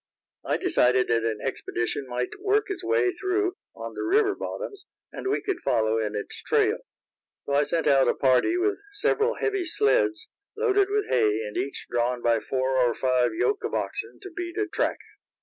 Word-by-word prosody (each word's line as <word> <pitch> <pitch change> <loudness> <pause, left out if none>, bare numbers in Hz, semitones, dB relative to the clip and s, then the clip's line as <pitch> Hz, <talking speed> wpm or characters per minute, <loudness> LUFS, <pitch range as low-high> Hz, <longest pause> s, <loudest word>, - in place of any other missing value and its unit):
I - - 0
decided 125 +1 +2
that 115 -1 +2
an 110 -2 -2
expedition 130 0 -3
might 125 0 -2
work 410 +1 +1
its 370 -1 -5
way 415 0 +2
through 380 +1 -1 0.2
on - - -7
the - - -5
river 400 +2 +3
bottoms, 405 -4 -6 0.2
and - - -6
we 405 - 0
could 395 -4 -2
follow 110 - +1
in 105 -1 -2
its 105 - -5
trail. - - +2 0.7
So 140 - -2
I 140 - +4
sent 165 +3 0
out 135 -2 +5
a - - +2
party 130 - +3
with 400 +3 0
several 435 +3 +1
heavy 400 -3 -1
sleds, 405 0 +1 0.3
loaded 405 -3 +2
with 420 0 0
hay, 110 -2 +2
and 105 - -7
each 140 - -3
drawn 120 0 0
by 115 -1 +3
four 130 +4 -1
or 120 -2 +3
five 125 -3 +1
yoke 415 - 0
of - - -2
oxen 445 +2 -3
to 385 - -8
beat 345 +1 -5
a 420 - +1
track. 355 - -1
340 Hz, 185 wpm, -26 LUFS, -, 0.7 s, out